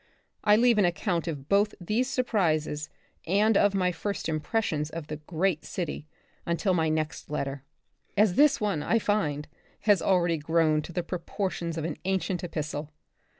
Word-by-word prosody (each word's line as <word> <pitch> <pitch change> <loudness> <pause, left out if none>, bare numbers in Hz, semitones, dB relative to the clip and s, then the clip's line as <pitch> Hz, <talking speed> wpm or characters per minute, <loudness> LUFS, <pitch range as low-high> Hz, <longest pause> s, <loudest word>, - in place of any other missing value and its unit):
I 210 0 +6
leave 235 0 +4
an 200 - +5
account 175 0 -1
of 145 -4 -5
both 205 +3 +2
these 220 +8 0
sur 255 -1 +1
prises 155 -9 0 0.4
and 205 +5 +3
of 200 0 +4
my 180 -2 +2
first 200 +4 -3
impressions 155 -1 -1
of 165 -1 -6
the 150 0 -5
great 160 +1 -1
city 160 -4 -4 0.4
until 170 +3 0
my 160 -2 +2
next 155 -1 -2
letter, 140 -2 -3 0.6
as 205 -2 +5
this 290 +6 +5
one, 200 -8 0
I 225 - +2
find, 160 -10 0 0.3
has 205 -4 +4
already 175 -3 +2
grown 155 0 +2
to 160 - -9
the 175 +1 -2
proportions 170 -1 -3
of 160 - -2
an 165 -3 -3
ancient 190 -1 -1
epistle. 150 -3 -4
175 Hz, 165 wpm, -28 LUFS, 155-200 Hz, 0.6 s, I